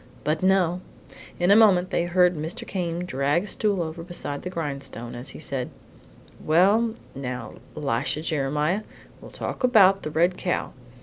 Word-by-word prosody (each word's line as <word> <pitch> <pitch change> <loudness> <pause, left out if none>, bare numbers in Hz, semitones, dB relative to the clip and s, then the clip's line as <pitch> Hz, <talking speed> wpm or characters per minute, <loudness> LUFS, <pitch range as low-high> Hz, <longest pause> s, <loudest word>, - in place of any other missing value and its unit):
But 155 +1 0
no! 185 -2 +2 0.6
In 175 +2 +3
a - - +8
moment 190 -5 +5
they 170 - +1
heard 180 0 +3
Mr. 165 +10 -4
Came 175 -3 -3
drag 145 +2 0
a - - -7
stool 200 -3 0
over 160 +1 -6
beside 165 -4 -5
the 180 - -5
grindstone 140 -8 -5
as 120 +3 -4
he - - -9
said: 135 -4 -3 0.7
"Well, 205 +8 +3 0.2
now 125 -2 -5 0.2
Elisha 140 +1 -1
Jeremiah, 150 +4 0 0.4
we'll - - -11
talk - - -6
about 195 -6 +5
the - - -4
red 170 +4 +2
cow. 180 - -2
170 Hz, 160 wpm, -25 LUFS, 150-185 Hz, 0.7 s, a